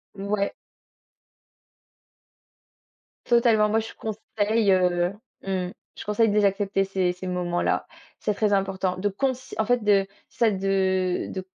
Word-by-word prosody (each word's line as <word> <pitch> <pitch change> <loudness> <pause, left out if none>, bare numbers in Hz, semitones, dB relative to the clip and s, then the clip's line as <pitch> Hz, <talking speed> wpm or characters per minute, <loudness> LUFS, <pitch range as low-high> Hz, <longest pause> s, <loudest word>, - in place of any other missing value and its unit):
Ouais. 200 0 -1 2.7
Totalement. 230 -3 +4
Moi, 220 +1 +2
je 225 - -6
conseille 215 -1 0
heu, 180 0 +2 0.3
mmh, 185 -2 -2 0.3
je - - -9
conseille 210 +1 +2
de - - 0
les 210 -1 +4
accepter 195 0 +1
ces 190 -2 0
ces 185 +1 -8
moments-là. 175 -1 0 0.3
C'est 210 - 0
très 210 0 +1
important 190 -1 0
de 205 +2 0
conce 260 +5 -2
en 220 - +1
fait, 245 -1 +1
de 200 -2 +3 0.2
ça 230 -2 +2
de 195 - -2
celle 190 -2 0
de, 190 -1 -5
195 Hz, 140 wpm, -25 LUFS, 185-215 Hz, 2.7 s, Totalement